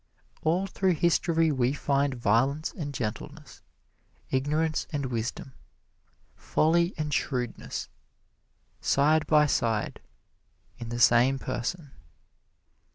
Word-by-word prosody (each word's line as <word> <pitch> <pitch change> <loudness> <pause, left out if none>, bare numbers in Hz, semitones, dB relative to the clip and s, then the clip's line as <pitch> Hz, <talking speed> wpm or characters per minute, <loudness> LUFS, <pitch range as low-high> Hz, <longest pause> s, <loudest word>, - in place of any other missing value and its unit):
All 175 +5 +1
through 190 -1 0
history 165 -1 +2
we 130 -2 +1
find 140 -1 0
violence 130 +7 +1
and 145 -5 -5
gentleness, 115 -6 -6 0.7
ignorance 150 +4 0
and 145 -2 -2
wisdom, 120 +2 -4 0.8
folly 170 +3 +1
and 150 -1 -2
shrewdness 125 -4 -3 0.9
side 150 +2 +2
by 150 -1 +5
side 115 -6 -1 0.8
in 120 -1 -6
the 120 0 -4
same 120 +3 +5
person. 145 +4 -4
145 Hz, 95 wpm, -27 LUFS, 125-160 Hz, 0.9 s, by